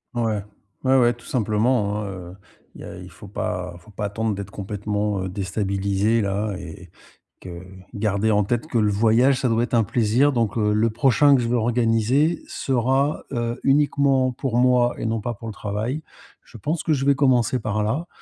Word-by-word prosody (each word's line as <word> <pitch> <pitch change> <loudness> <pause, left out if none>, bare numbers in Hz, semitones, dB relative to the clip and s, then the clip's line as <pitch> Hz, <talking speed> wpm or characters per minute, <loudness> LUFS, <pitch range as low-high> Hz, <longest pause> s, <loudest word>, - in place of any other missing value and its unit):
Ouais. 110 -4 -1 0.4
Ouais 130 0 +4
ouais, 120 -1 +4
tout 120 0 -18
simplement 110 -2 0
hein, 105 - -4
heu, 90 -1 -8 0.4
il - - -12
y - - -8
a - - -9
il - - -10
faut - - -13
pas 90 -1 -4
faut 110 - -18
pas 105 +1 -4
attendre 110 +1 -2
d'être 100 -1 -6
complètement, 105 0 -3
heu, 95 - -4
déstabilisé 100 +2 0
là 100 +1 -2
et 85 +1 -10 0.5
que 85 -1 -8 0.3
garder 105 +1 0
en 105 0 +3
tête 120 +6 -1
que 125 - -1
le 105 -1 +2
voyage 115 +6 +3
ça 125 - +1
doit 115 +1 +2
être 120 - -5
un 115 - +4
plaisir, 120 +7 +2
donc 115 -4 -1
heu, 105 -1 +2
le 110 +2 +2
prochain 135 +4 +4
que 125 - +2
je 115 - -1
veux 120 - +2
organiser 120 +6 +1
sera, 135 +3 0
heu, 120 +1 -2
uniquement 140 -2 +3
pour 120 -1 -2
moi 125 -1 +3
et - - -4
non 115 -1 -1
pas 120 +2 -3
pour 115 - -9
le - - -6
travail. 110 +9 -3 0.4
Je 115 - -14
pense 155 - -2
que 160 - +1
je 135 -2 -1
vais 140 0 +4
commencer 130 -3 +2
par 105 0 -1
là, 140 +11 -2
115 Hz, 200 wpm, -23 LUFS, 105-125 Hz, 0.5 s, Ouais